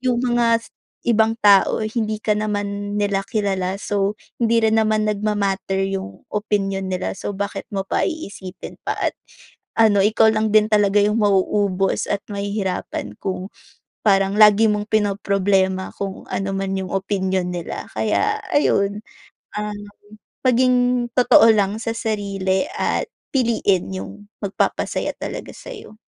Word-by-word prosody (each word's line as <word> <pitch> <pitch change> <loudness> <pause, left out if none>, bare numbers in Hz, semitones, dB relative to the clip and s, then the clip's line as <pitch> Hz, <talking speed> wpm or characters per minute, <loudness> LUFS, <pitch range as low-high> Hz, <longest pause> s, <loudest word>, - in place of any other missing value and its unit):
yung 250 -1 0
mga 235 -1 +2 0.5
ibang 220 0 +3
tao, 200 +1 +5
hindi 215 -1 -2
ka 215 - +2
naman 205 -1 -3
nila 200 -1 +1
kilala, 195 -3 -1
so 200 0 0 0.3
hindi 230 -1 +3
rin 220 0 +3
naman 215 0 +1
nagma-matter 200 -2 -1
yung 145 - -5
opinyon 195 -2 -1
nila. 185 0 -2
So 205 - -4
bakit 200 +1 -4
mo 195 - 0
pa - - 0
iisipin 200 - -8
pa - - 0
at - - 0 0.6
ano, 215 -3 +5
ikaw 220 +1 +4
lang 215 0 +1
din 215 - +7
talaga 205 -1 +3
yung 210 +2 +2
mauubos 195 -1 +1
at 200 0 -1
mahihirapan 200 - -3
kung 190 0 -4 0.6
parang 195 0 +3
lagi 215 +1 +7
mong 210 0 -1
pinoproblema 195 -2 +1
kung 195 -1 -5
ano 195 0 -2
man 195 0 -2
yung 190 -1 -5
opinyon 190 -2 -1
nila. 175 -2 -5
Kaya 425 - +1 0.2
ayun, 205 -7 +2 0.6
um, 210 -1 -4 0.7
maging 250 0 +3
totoo 230 -2 +6
lang 205 0 +1
sa 225 - -2
sarili 200 -4 -1
at - - 0 0.3
piliin 220 - +1
yung 95 - -7 0.2
magpapasaya 200 -1 -1
talaga - - -5
sa'yo. 420 - -11
205 Hz, 135 wpm, -21 LUFS, 195-220 Hz, 0.7 s, din